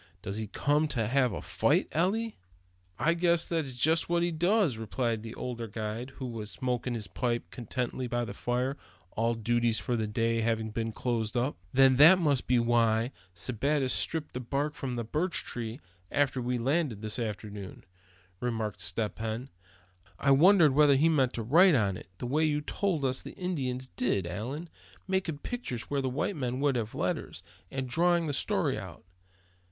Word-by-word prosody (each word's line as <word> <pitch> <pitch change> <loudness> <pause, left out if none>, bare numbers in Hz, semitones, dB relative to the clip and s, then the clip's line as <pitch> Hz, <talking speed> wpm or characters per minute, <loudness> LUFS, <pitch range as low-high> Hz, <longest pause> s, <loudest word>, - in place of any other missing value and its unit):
Does 100 +2 -3
he 110 -1 -3
come 145 +8 +1
to 125 -7 -1
have 130 +2 +2
a - - -5
fight, - - +2
Eli?" 205 +8 +1 0.7
"I 165 - +2
guess 170 0 +2
that's 155 -7 -2
jest 160 +7 +2
what 170 0 +2
he 175 - +1
does," 175 - +2
replied 115 0 -2
the 115 +1 -8
older 120 -2 -4
guide, 110 +4 -5
who 130 - -6
was 115 -4 -5
smoking 125 0 -2
his 110 -3 -3
pipe 120 +6 -2
contentedly 125 +1 -3
by 120 0 -1
the 100 - -6
fire, 125 +6 -1 0.3
all 115 +1 0
duties 115 0 +1
for 125 - -1
the 110 -2 -1
day 115 +1 0
having 110 -1 0
been 115 +1 -2
closed 115 0 -2
up. 125 +4 0 0.2
"Then 130 -1 +5
that 160 +7 +9
must 145 -7 +2
have - - -26
been 120 -2 +3
why 115 0 +2 0.2
Sebattis 130 - 0
stripped 160 -2 0
that 125 -2 -6
bark 145 +2 0
from 130 -4 -4
the 120 - -2
birch 155 +10 -1
tree 115 +1 -5 0.3
after 140 -2 +1
we 125 +1 -1
landed 130 -3 0
this 110 +3 -1
afternoon," 105 -3 -6 0.6
remarked 110 -4 -2
Step 105 +5 -2
Hen. 115 +4 -3 0.7
"I 140 - +2
wondered 160 +1 +6
whether 145 0 +6
he 155 +5 +4
meant 135 -5 +2
to 115 - -3
write 165 - +6
on 100 -6 +2
it, 90 - -10
the 125 - -5
way 145 +6 +1
you 150 -1 +1
told 165 -2 -1
us 130 0 0
the - - -10
Indians 130 -9 -2
did, 120 -7 -1
Allan; 120 - -5 0.4
making 190 -5 -1
pictures 145 - -5
where 140 -1 +1
white 130 +9 -1
men 130 -3 -2
would 140 -2 +2
have 115 -2 -3
letters, - - -3 0.3
and 135 -1 -3
drawing 170 +5 +2
the 145 - -2
story - - 0
out. - - -10
125 Hz, 180 wpm, -29 LUFS, 115-150 Hz, 0.7 s, that